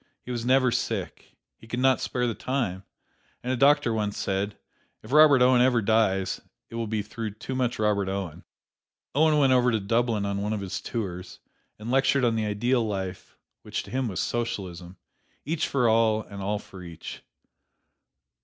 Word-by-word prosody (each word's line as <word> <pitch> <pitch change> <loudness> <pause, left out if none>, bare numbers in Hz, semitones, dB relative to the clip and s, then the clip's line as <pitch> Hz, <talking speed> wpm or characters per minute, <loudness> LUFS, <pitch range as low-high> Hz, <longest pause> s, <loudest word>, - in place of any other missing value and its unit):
He 125 - -7
was 120 -2 -3
never 130 +1 +3
sick - - -4 0.2
he 115 - -15
could 120 +2 -3
not 130 0 +3
spare 125 -1 -1
the 120 - 0
time 110 -8 -2 0.6
and 125 +1 -1
a - - +1
doctor 140 -2 +4
once 105 -2 -2
said, 100 +2 -2 0.5
"If - - -11
Robert 145 -3 +7
Owen 125 -1 +5
ever 125 -1 +4
dies, 105 -3 +1 0.3
it - - -8
will 115 -1 -2
be 105 -1 -1
through 110 0 -6
too 130 - -6
much 125 -2 0
Robert 105 -3 +1
Owen." 95 -5 -4 0.7
Owen 155 +1 +4
went 135 -3 +4
over 125 -1 +4
to 110 - +1
Dublin 115 0 0
on 100 0 -2
one 105 +1 -1
of 105 - -3
his 95 -2 -4
tours, 95 -6 -5 0.4
and 110 +3 -6
lectured 135 0 +3
on 115 -1 +2
the 110 -1 0
ideal 120 +4 +1
life, 95 -3 -5 0.2
which - - -4
to - - -12
him 130 -1 -1
was 95 -6 -4
Socialism, 95 -6 -3 0.5
"each 160 +1 -1
for 125 -4 +2
all 110 -1 +3
and 100 -1 -9
all 105 +2 -1
for 95 -2 -11
each." 85 -2 -9
115 Hz, 180 wpm, -26 LUFS, 100-125 Hz, 0.7 s, Robert